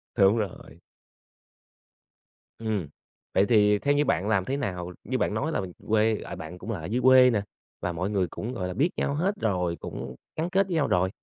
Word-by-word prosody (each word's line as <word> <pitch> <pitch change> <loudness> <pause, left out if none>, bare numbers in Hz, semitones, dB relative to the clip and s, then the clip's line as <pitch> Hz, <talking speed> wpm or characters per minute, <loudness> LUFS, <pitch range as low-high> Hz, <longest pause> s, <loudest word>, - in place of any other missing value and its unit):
Đúng 100 +1 +5
rồi. 105 -5 -5 1.8
Ừm, 110 -7 -2 0.5
vậy 95 - +4
thì 105 -1 +4
theo 145 +5 +2
như 145 +1 +2
bạn 100 -6 +1
làm 100 -4 +2
thế 135 +5 -1
nào 90 -9 -3
như 130 - -1
bạn 105 - 0
nói 140 +9 -1
là - - 0 0.3
quê, 110 0 +2
à, - - -7
bạn 80 +3 -8
cũng 110 - -6
là 100 - -3
ở 80 - -7
dưới 115 +8 -1
quê 130 0 +7
nè, 110 -4 +1 0.4
và - - -1
mọi 90 +3 -2
người 95 -3 +1
cũng, 115 +8 -5
gọi 90 -7 -3
là, 90 - -4
biết 145 - +2
nhau 140 - 0
hết 185 +7 0
rồi, 90 -6 0
cũng 65 0 -6 0.2
gắn 165 +2 -1
kết 195 +1 +2
nhau 160 -5 +1
rồi. 90 +1 +2
105 Hz, 210 wpm, -27 LUFS, 90-130 Hz, 1.8 s, quê